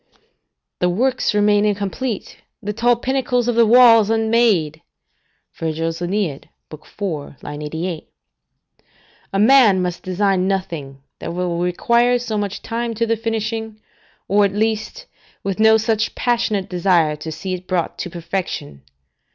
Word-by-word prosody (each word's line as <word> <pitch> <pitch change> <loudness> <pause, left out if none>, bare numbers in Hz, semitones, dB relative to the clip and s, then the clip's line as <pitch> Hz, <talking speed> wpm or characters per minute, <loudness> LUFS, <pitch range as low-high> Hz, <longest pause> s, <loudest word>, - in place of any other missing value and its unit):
["The 180 - +2
works 255 +8 +1
remain 205 0 +3
incomplete, 205 +3 -2 0.2
the 210 -2 -4
tall 240 +3 +3
pinnacles 250 -1 -1
of 240 - +2
the 230 -1 +4
walls 230 -2 +7
unmade." 220 -9 +2 0.8
AEneid, 165 +1 -2 0.2
iv. 150 -3 -6
88.] 160 +2 -4 1.2
A 195 - -1
man 220 -4 +6
must 180 -1 -2
design 185 0 0
nothing 165 -9 -4 0.2
that 170 - -5
will 175 -1 -2
require 235 +8 +2
so 240 -3 -4
much 205 -1 -3
time 235 -1 -3
to 230 +2 0
the 230 0 +1
finishing, 225 -1 -3 0.5
or, 205 +2 +3
at 200 -1 +1
least, 220 - -2 0.4
with 195 0 -3
no 220 0 +6
such 220 0 -1
passionate 235 -5 0
desire 175 -4 +2
to 160 +2 -6
see 185 +4 -5
it 185 0 -6
brought 180 -3 -2
to 180 - -4
perfection. 170 - -5
205 Hz, 130 wpm, -20 LUFS, 175-225 Hz, 1.2 s, walls